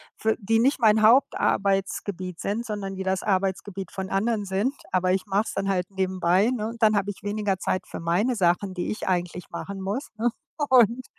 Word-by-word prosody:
für 220 0 0
die 225 +2 +2
nicht 270 +4 +2
mein 220 -2 +4
Hauptarbeitsgebiet 195 -5 +2
sind, 225 +4 -2
sondern 200 -3 -4
die 190 - -4
das 190 0 0
Arbeitsgebiet 195 -1 -2
von 190 -1 -5
anderen 210 +1 0
sind, 200 +8 0 0.2
aber 185 0 +2
ich 190 0 0
mache 200 +1 +1
es - - -5
dann 195 0 -2
halt 185 -1 0
nebenbei, 190 +2 +1
ne? 220 -4 -2
Und 230 0 -10
dann 215 -1 +5
habe 200 0 0
ich - - -13
weniger 205 -1 -1
Zeit 185 - -1
für - - -7
meine 180 +9 +1
Sachen, 185 0 +1
die 175 -1 -3
ich 215 - -5
eigentlich 180 0 -2
machen 195 +3 -6
muss, 205 +9 -3
ne? 235 +2 +2 0.4
Und 245 0 +4
195 Hz, 200 wpm, -25 LUFS, 190-220 Hz, 0.4 s, dann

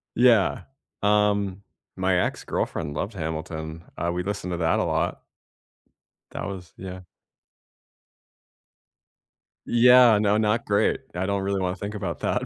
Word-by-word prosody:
Yeah, 120 -4 +4 0.4
um, 105 -2 +1 0.3
my 95 -1 +1
ex - - -4
girlfriend 75 -3 -3
loved 100 +9 -3
Hamilton. 80 -1 -5
Uh, 85 - -1
we 90 +1 -2
listened 95 -2 -4
to 85 - -2
that 80 -1 +1
a - - +2
lot. - - -1 1.1
That - - -5
was 90 -4 -8
yeah. 95 0 -7 2.7
Yeah, 125 -1 +7
no, 105 0 +2
not 110 +2 +1
great. 100 0 +1
I 90 +2 -1
don't 100 0 -1
really 100 0 -1
wanna 90 0 -1
think 100 +2 -6
about 95 -5 -4
that, - - 0
95 Hz, 135 wpm, -25 LUFS, 90-105 Hz, 2.7 s, Yeah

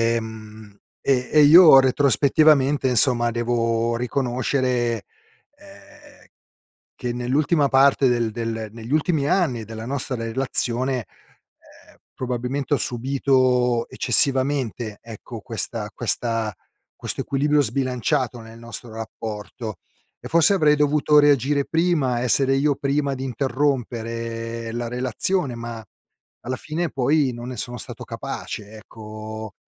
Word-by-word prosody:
ehm, 110 -2 -8 0.2
e 125 -2 +1
e 150 - +6
io 155 -1 +9
retrospettivamente 140 +1 +3
insomma 120 -1 +2
devo 115 0 0
riconoscere, 125 -1 -1 0.5
ehm, 295 0 -17 0.7
che 120 -2 -4
nell'ultima 140 +4 +1
parte 135 0 +4
del 120 -2 0
del 115 -1 -4
negli 115 +2 -9
ultimi 155 -2 +1
anni 145 - +1
della 110 +1 -8
nostra 130 -1 -3
relazione, 125 +1 -1 0.5
ehm, - - -21 0.2
probabilmente, 130 +3 -3
ho - - -1
subito 125 -1 +1
eccessivamente, 130 -5 0
ecco, 115 -2 -9
questa - - -4
questa 115 -2 -1 0.4
questo - - -4
equilibrio 145 +2 +1
sbilanciato 130 -2 -1
nel 115 0 -12
nostro 115 0 -7
rapporto. 110 0 -7 0.4
E - - -9
forse 170 +4 +4
avrei 155 -5 +4
dovuto 150 0 +3
reagire 140 0 +3
prima, 155 -8 +1
essere 135 +2 +2
io 145 0 +2
prima 140 0 -1
di 130 - -6
interrompere 115 -4 -2
la 120 0 -3
relazione, 130 - -1
ma 115 -1 -7 0.6
alla 130 +1 -2
fine 160 +4 -3
poi 135 +1 +1
non 120 +1 -8
ne 125 - -6
sono 120 +3 -5
stato - - -8
capace, 105 0 -6
ecco 110 0 -9
125 Hz, 115 wpm, -22 LUFS, 115-140 Hz, 0.7 s, io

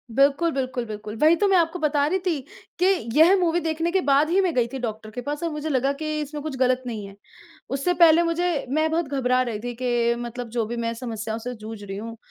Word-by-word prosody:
बिल्कुल, 285 +5 +3
बिल्कुल, 255 -3 -2
बिल्कुल 210 0 -7
वही 315 +2 +6
तो 405 +3 +2
मैं 385 -2 +4
आपको 335 +1 +1
बता 295 -2 +2
रही 375 +4 0
थी, 335 -5 +1 0.4
कि 360 - +3 0.3
यह 340 +5 +7
मूवी 345 -1 +2
देखने 325 +1 -1
के 380 +1 +2
बाद 285 0 +3
ही 365 +3 +3
मैं 365 -3 0
गई 245 -2 +2
थी 265 +2 -6
डॉक्टर 220 -3 -5
के 245 +3 -5
पास 290 +4 -4
और 335 - 0
मुझे 300 +1 -4
लगा 270 -1 +1
कि 310 -1 -2
इसमें 295 0 -5
कुछ 305 -3 -4
ग़लत 255 0 +2
नहीं 215 -4 -5
है। 195 - -13 0.5
उससे 275 +7 0
पहले 340 -1 +6
मुझे 335 -2 0
मैं 310 +3 +1
बहुत 325 -2 0
घबरा 255 -2 +1
रही 235 -4 -2
थी 245 0 -3
कि 240 -1 +1
मतलब 240 0 -6
जो 225 - +1
भी 235 +2 -5
मैं 230 0 -2
समस्याओं 225 -2 -5
से 250 +2 -5
जूझ 220 -1 -9
रही 195 0 -6
हूँ, 230 +2 -7
275 Hz, 245 wpm, -24 LUFS, 235-325 Hz, 0.5 s, यह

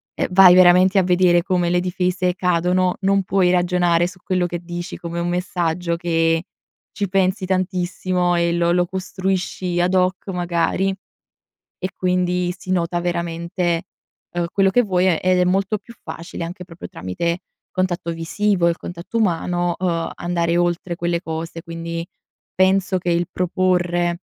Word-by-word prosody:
eh, - - -1
vai 185 -1 +8
veramente 185 +2 +6
a - - +3
vedere 180 -1 +4
come 180 -2 +1
le 180 - +3
difese 180 0 0
cadono. 180 0 +1
Non 195 0 +2
puoi 185 -1 +2
ragionare 175 -1 +2
su 180 0 -12
quello 185 -2 0
che 175 -1 -4
dici 175 0 -6
come 170 0 -5
un 170 - -1
messaggio, 175 -1 -1
che 165 -1 +1 0.5
ci 200 -2 -2
pensi 190 0 +1
tantissimo 180 -1 0
e 170 0 +1
lo 170 0 +2
lo 175 0 +2
costruisci 185 -1 -2
ad 180 +2 +1
hoc, 185 +1 +1
magari; 175 +1 0 0.9
e 185 - -2
quindi 180 -1 0
si 185 - -12
nota 175 -1 0
veramente, 170 0 -2 0.5
uhm, 175 -1 0
quello 195 -1 +3
che 245 +3 +4
vuoi 185 -2 +1
e 170 -4 +2
ed 185 0 +3
è 180 - +4
molto 195 +3 +1
più 235 +3 -14
facile 170 0 -7
anche 180 +2 -7
proprio 170 -1 -10
tramite 170 - -3 0.3
contatto 180 -2 -1
visivo, 175 +2 0
il 170 - -1
contatto 175 +6 -6
umano, 175 -3 0
uhm, 170 -3 -1
andare 170 -1 -1
oltre 175 0 0
quelle 170 0 -1
cose. 165 0 -5
Quindi, 165 0 -5 0.5
penso 190 0 +2
che 175 -1 -2
il 170 +1 +1
proporre, 175 -1 0
180 Hz, 155 wpm, -21 LUFS, 170-185 Hz, 0.9 s, vai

